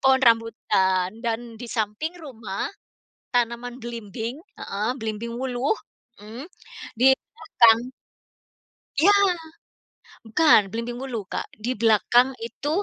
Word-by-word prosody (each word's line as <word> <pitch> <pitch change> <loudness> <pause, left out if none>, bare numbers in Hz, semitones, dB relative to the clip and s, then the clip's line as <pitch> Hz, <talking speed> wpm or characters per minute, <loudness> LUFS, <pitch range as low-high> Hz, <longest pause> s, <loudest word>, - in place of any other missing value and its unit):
Pohon 265 0 +5
rambutan 195 -5 +2
dan 230 0 -3
di 245 - -6
samping 225 - -2
rumah, 225 -9 -5 0.7
tanaman 240 0 0
belimbing 230 +2 -5 0.2
heeh, 210 +4 -2
belimbing 220 +1 -4
wuluh, 260 - 0 0.5
mmm, 230 +7 -8 0.5
di 265 +2 +6 0.2
belakang 235 - +4 1.1
Iya. 390 +7 +6 1.1
Bukan, 295 +5 +6
belimbing 235 +2 -4
wuluh, 235 -6 -4
Kak. - - -5
Di 250 +2 0
belakang 240 +4 +3
itu, 235 +5 -5
235 Hz, 105 wpm, -24 LUFS, 220-255 Hz, 1.1 s, di